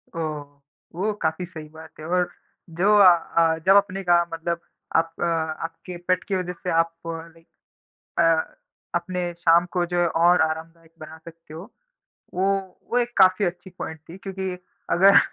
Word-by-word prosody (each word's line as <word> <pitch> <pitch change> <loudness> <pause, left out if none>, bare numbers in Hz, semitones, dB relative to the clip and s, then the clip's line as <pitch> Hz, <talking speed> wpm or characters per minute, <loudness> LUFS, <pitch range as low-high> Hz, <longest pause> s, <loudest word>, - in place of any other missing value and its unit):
ओह! 155 -3 -3 0.5
वो 205 +5 0
काफ़ी 160 +3 -1
सही 160 -3 -10
बात 160 +1 -12
है 155 - -8
और 180 +1 +1 0.5
जो 205 +3 +5
अ 200 -3 +9 0.3
अ, 165 -1 +4
जब 195 +1 +6
अपने 195 -1 0
का 175 -1 +4
मतलब 170 +1 -2 0.4
आप 165 0 +2
अ, - - +1
आपके 165 +1 -3
पेट 185 0 +2
की 195 - -2
वज़ह 180 -1 -2
से 180 - -2
आप 165 0 +1
लाइक 165 0 -8 0.7
अ, 165 -1 +2 0.4
अपने 175 0 -2
शाम 170 0 +4
को 180 -1 +1
जो 175 0 -1
है 175 - +3
और 175 +2 +4
आरामदायक 160 +1 -4
बना 155 +1 -10
सकते 165 -2 -13
हो। 180 +8 -9 0.6
वो 185 +2 0 0.5
वो 245 - +2
एक 240 0 0
काफ़ी 190 +1 +5
अच्छी 175 +1 -4
पॉइंट 160 - -5
थी 175 - -9
क्योंकि 190 -1 -5 0.3
अगर 195 +3 +7
170 Hz, 170 wpm, -24 LUFS, 165-185 Hz, 0.7 s, अ